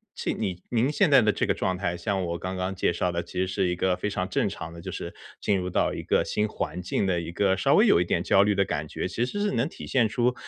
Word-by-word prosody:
其 - - -2
你 90 -1 -3
您 120 +3 +2
现 180 +3 +3
在 135 - +8
的 105 -2 +3
这 - - 0
个 - - +2
状 95 - -1
态， 90 -2 -2
像 95 +2 -1
我 85 0 -3
刚 95 +1 -4
刚 95 +1 -2
介 90 -2 0
绍 90 +1 0
的 85 - -2
其 85 - -15
实 95 - +1
是 95 0 0
一 90 - 0
个 90 +1 +1
非 105 - -2
常 95 -2 -2
正 - - +1
常 80 +1 -6
的， 85 - -10
就 95 - -6
是 85 - -6 0.3
进 100 - +2
入 90 0 -3
到 - - +1
一 - - -5
个 - - +2
新 105 - 0
环 90 -3 -4
境 90 - -1
的 90 -2 +1
一 85 0 -5
个 95 +1 +2
稍 - - +3
微 - - +6
有 - - +5
一 90 - +1
点 85 - 0
焦 100 +2 +5
虑 105 -1 +2
的 100 - +3
感 75 -2 -3
觉。 - - -3
其 120 - -1
实 165 +11 -4
是 205 - +1
能 120 +4 +1
体 - - -9
现 120 -4 +3
出， 120 +3 +1
95 Hz, 325 characters per minute, -26 LUFS, 90-105 Hz, 0.3 s, 在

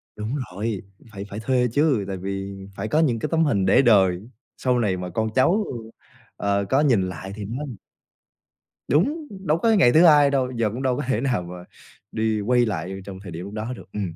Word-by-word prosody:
Đúng 110 +5 -4 0.2
rồi, 100 +1 -3 0.3
phải 100 -1 -7
phải 105 +1 -6
thuê 125 +1 +1
chứ. 145 -7 +2
Tại 95 - -4
vì 95 +1 -5 0.2
phải 100 +3 -4
có 150 - +1
những 130 -8 +2
cái - - -2
tấm 165 0 +3
hình 100 -9 +1
để 95 - +5
đời 100 -3 +3 0.3
sau 125 -1 +1
này 100 -5 0
mà 90 0 -5
con 110 +5 -1
cháu, 180 +11 +3 0.7
ờ, 100 0 0
có 135 - +3
nhìn 115 -11 +2
lại 95 +2 -7
thì 105 -2 -6
nó 125 +8 -5 1.2
Đúng, 290 - +1 0.2
đâu 155 +2 +3
có 225 +7 +1
ngày 185 - +5
thứ 160 +7 +6
hai 145 -3 +7
đâu. 130 -2 0
Giờ 115 -3 0
cũng 120 +5 -6
đâu 130 -1 +1
có - - -2
thể 130 -4 0
nào 130 -7 0
mà 90 0 -9 0.5
đi 110 -1 0
quay 120 +3 +3
lại 95 -2 -4
trong 95 -2 -8
thời 95 - -8
điểm 85 +3 -6
lúc 100 - -9
đó 110 +3 -4
được. 100 - -14
Ừm, 95 -6 -4
110 Hz, 215 wpm, -23 LUFS, 100-135 Hz, 1.2 s, hai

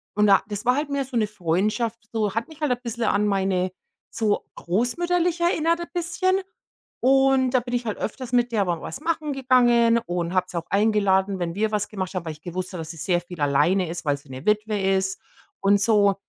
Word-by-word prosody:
und 210 0 +4
da 195 -1 +6
das 205 0 -5
war 250 +1 +3
halt 295 0 -2
mehr 280 -1 -1
so 260 -2 -4
'ne 215 -2 +2
Freundschaft, 210 +5 -1
so 215 -3 0
hat 230 +1 -2
mich 315 -1 -15
halt 300 -3 +1
ein 245 - 0
bisschen 235 -1 -4
an 210 -1 +2
meine 190 -2 0 0.4
so, 215 -2 0
großmütterlich 345 - 0
erinnert 335 -1 +2
ein 345 - -5
bisschen. 370 +2 0 0.6
Und 270 0 +4
da 255 - +3
bin 245 +1 -7
ich 240 0 -2
halt 215 - -3
öfters 250 +2 -5
mit 245 0 +2
der 210 -4 +1
mal 175 -2 -2
was - - -6
machen 310 -2 -1
gegangen 240 -3 +4
und 175 0 -2
habe 185 -1 +1
sie 175 - -5
auch 170 - -3
eingeladen, 200 -2 +2
wenn 170 -1 -2
wir 215 +1 0
was 210 -1 -1
gemacht 190 -2 -5
haben, 180 -2 -3
weil 160 - -3
ich 155 - -17
gewusst 180 +2 -5
habe, 180 - -5
dass 160 - -8
sie 165 - -11
sehr 175 +3 0
viel 175 -1 -11
alleine 155 +6 +2
ist, 170 0 -5
weil 145 -1 +1
sie 140 0 -18
'ne 130 +2 -8
Witwe 210 0 +1
ist 190 0 0 0.4
und 200 +1 +4
so. 205 -2 +4
210 Hz, 225 wpm, -24 LUFS, 185-250 Hz, 0.6 s, da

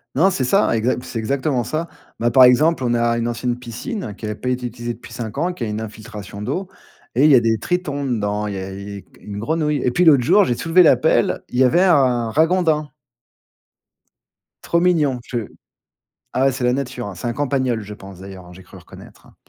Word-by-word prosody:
Non, 170 +8 +4
c'est 155 -8 -1
ça, 195 - +2
exa 115 +3 +1
c'est 115 - -5
exactement 130 +2 -1
ça. 155 +7 -3 0.3
Bah, 120 +1 +1
par 130 +2 +7
exemple, 130 +4 +4
on 120 -1 +1
a 115 0 +1
une 120 0 -1
ancienne 120 +1 -2
piscine 125 - -6
qui - - -7
avait 105 0 -3
pas 125 - -4
été 125 0 -2
utilisée 120 0 -5
depuis 120 - -13
5 115 0 -6
ans 165 +5 +1
et - - -4
qui 155 - -6
a - - -2
une 105 0 -3
infiltration 105 -2 -8
d'eau 185 - -3 0.5
et 130 - +3
il 155 - +6
y - - +8
a - - +7
des 115 -1 +1
tritons 145 - -2
dedans, 105 -4 -1
il 105 - -4
y - - -4
a 95 0 -6
et 100 0 -8 0.2
une 100 -1 -7
grenouille. 150 +5 0
Et - - +2
puis 175 - +2
l'autre 145 -7 +6
jour, 190 - +5
j'ai 120 - 0
soulevé 165 +7 +4
la 160 - +5
pelle, 135 -7 +1
il 125 - -4
y - - +6
avait 130 +7 +3
un 130 -10 +3
ragondin. 160 +1 +1 1.7
Trop 170 - +1
mignon 155 -7 +2
je 120 - -3 1.0
ah 130 +2 +2
ouais, 135 - +4
c'est 130 0 -5
la 125 0 +2
nature, 130 -2 -4
hein? 100 - -6
C'est 90 +6 -6
un 120 - -1
campagnol, 130 -3 -1
je 105 +1 -9
pense, 95 -2 -12
d'ailleurs, 95 -2 -11
hein? 90 - -13
J'ai 95 +1 -14
cru 90 - -15
reconnaître, - - -15
hein? - - -22
125 Hz, 230 wpm, -20 LUFS, 110-150 Hz, 1.7 s, y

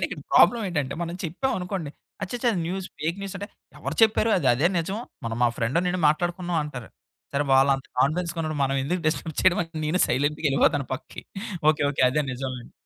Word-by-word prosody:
Main - - +1
ఇక్కడ - - -7
problem 235 -2 +6
ఏంటంటే 145 -6 -2
మనం 170 0 -4
చెప్పాం 225 +12 -1
అనుకోండి. 180 -5 -4 0.3
అచ్చచ్చ! 245 +5 -4
అది 180 - -1
న్యూస్ 190 +1 -3
ఫేక్ 165 +4 -1
న్యూస్ 195 0 -5
అంటే 205 +1 -6 0.3
"ఎవరు - - -4
చెప్పారు? 220 0 +4
అది 140 -7 +1
అదే 145 +8 +2
నిజం. 190 +6 -2 0.3
మొన్న 115 -1 -2
మా 120 - +5
ఫ్రెండ్ 120 +8 0
నేను 180 0 -1
మాట్లాడుకున్నాం" 175 +2 -1
అంటారు. 125 -6 -7 0.5
సరే 145 +1 +2
వాళ్ళంత 135 0 +4 0.2
కాన్ఫిడెన్స్‌గా 170 +4 0
ఉన్నప్పుడు 155 -2 -2
మనం 135 0 0
ఎందుకు 180 +5 -1
డిస్టర్బ్ 160 0 -1
చేయడమని 170 -3 +1
నేనే 180 +4 +1
సైలెంట్‌గా 145 +5 0
వెళ్ళిపోతాను 140 0 +2
పక్కకి. - - -9 0.5
ఓకే. 150 - -1
ఓకే. 135 - 0
అదే 150 +3 +1
నిజంలేండి. 130 -1 -6
160 Hz, 185 wpm, -25 LUFS, 140-180 Hz, 0.5 s, problem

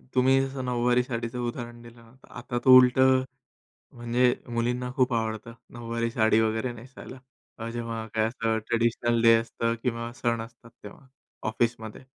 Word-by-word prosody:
तुम्ही 130 +1 +4
जसं 135 -1 -6
नऊवारी 125 0 +1
साडीचं 120 0 -4
उदाहरण 120 -1 -7
दिलं 120 0 -15
ना, 115 0 -19
तर - - -19
आता 120 0 -4
तो 130 0 +9
उलटं 130 +1 +5 0.7
म्हणजे 120 +1 +2
मुलींना 120 +1 -2
खूप 130 -1 +2
आवडतं 110 0 -3 0.2
नऊवारी 115 0 -3
साडी 110 -1 +3
वगैरे 110 +3 -1
नेसायला, 130 +2 -12 0.4
अ, 115 +1 -5
जेव्हा 115 -1 -5
काय 110 0 +2
असं 115 -2 -1
ट्रेडिशनल 120 0 +1
डे 115 0 +7
असतं 115 0 -2
किंवा 115 -1 -3
सण 115 -1 0
असतात 115 0 -14
तेव्हा 105 +6 -12 0.4
ऑफिसमध्ये. 110 +1 -3
120 Hz, 155 wpm, -26 LUFS, 115-125 Hz, 0.7 s, तो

